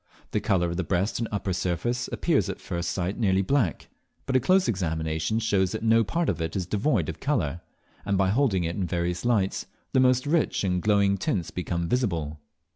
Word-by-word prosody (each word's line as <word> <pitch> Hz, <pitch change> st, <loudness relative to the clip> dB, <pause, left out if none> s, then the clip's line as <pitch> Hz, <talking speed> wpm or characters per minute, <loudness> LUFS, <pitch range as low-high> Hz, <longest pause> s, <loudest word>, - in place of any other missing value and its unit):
The -, -, +1 dB
colour 85 Hz, -3 st, +1 dB
of 85 Hz, -, -4 dB
the 95 Hz, -, 0 dB
breast 95 Hz, +6 st, 0 dB
and 115 Hz, -, -1 dB
upper 100 Hz, -2 st, -2 dB
surface 105 Hz, +8 st, -1 dB
appears 140 Hz, -, +1 dB
at 95 Hz, -, -5 dB
first 85 Hz, -2 st, -3 dB
sight 95 Hz, +3 st, -2 dB
nearly 95 Hz, -3 st, +2 dB
black, 120 Hz, -, 0 dB, 0.4 s
but 130 Hz, -, -1 dB
a -, -, +6 dB
close 185 Hz, +8 st, +3 dB
examination 80 Hz, -1 st, -1 dB
shows 100 Hz, -4 st, +1 dB
that 110 Hz, -, -4 dB
no 115 Hz, 0 st, +4 dB
part 165 Hz, +10 st, -1 dB
of 85 Hz, -4 st, -1 dB
it 80 Hz, 0 st, -3 dB
is 95 Hz, -2 st, -1 dB
devoid 100 Hz, -, 0 dB
of 80 Hz, -, -5 dB
colour; 85 Hz, -, -1 dB, 0.4 s
and 100 Hz, -1 st, 0 dB
by 95 Hz, 0 st, +2 dB
holding 110 Hz, -7 st, +2 dB
it 85 Hz, +1 st, -2 dB
in 95 Hz, -3 st, -2 dB
various 85 Hz, +2 st, -2 dB
lights, 105 Hz, -6 st, +1 dB, 0.3 s
the 130 Hz, -, +4 dB
most 130 Hz, 0 st, +3 dB
rich 155 Hz, -5 st, +1 dB
and 90 Hz, -2 st, 0 dB
glowing 100 Hz, -1 st, +3 dB
tints 90 Hz, -2 st, -1 dB
become 85 Hz, -1 st, -2 dB
visible. 85 Hz, -, -1 dB
95 Hz, 200 wpm, -26 LUFS, 85-115 Hz, 0.4 s, a